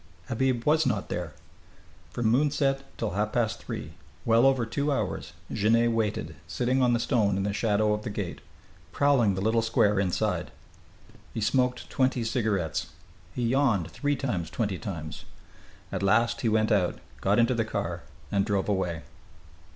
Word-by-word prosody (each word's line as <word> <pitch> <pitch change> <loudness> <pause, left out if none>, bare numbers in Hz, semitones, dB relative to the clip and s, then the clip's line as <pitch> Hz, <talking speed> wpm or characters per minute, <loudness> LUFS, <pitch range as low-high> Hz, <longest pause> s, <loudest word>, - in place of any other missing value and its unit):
Habib 125 0 0
was 155 0 +3
not 105 -6 -1
there. 85 -3 -4 0.7
From 120 - -3
moonset 135 +3 +2 0.2
till 115 - -2
half 105 +2 -1
past 115 -2 0
three, 80 - -6 0.3
well 115 +3 +5
over 130 -3 +2
two 140 +6 -1
hours, 140 - -2 0.2
Genet 115 +2 +3
waited, 105 -9 -1
sitting 130 +7 0
on 125 -1 +4
the 120 - +2
stone 105 -6 +2
in 95 - 0
the 100 0 -1
shadow 105 0 +2
of 105 - -2
the 110 - -5
gate, 100 -4 -4 0.5
prowling 130 -9 +3
the 95 - -3
little 110 +3 +2
square 105 -3 +2
inside. 95 -3 0 0.9
He - - -1
smoked 125 +3 +1
twenty 130 -2 +1
cigarettes. 105 - -1 0.5
He 125 - -1
yawned 115 - +2
three 145 0 0
times 100 - -2
twenty 100 -1 -2
times. 80 -6 -6 0.7
At - - -2
last 115 +4 +2
he 115 - +2
went 110 +1 +2
out 95 -4 +2 0.2
got 100 +2 +2
into 120 +2 +4
the 115 -2 +1
car 110 - -3 0.3
and 100 -1 +2
drove 100 -2 0
away. 90 -5 -1
110 Hz, 160 wpm, -27 LUFS, 100-125 Hz, 0.9 s, well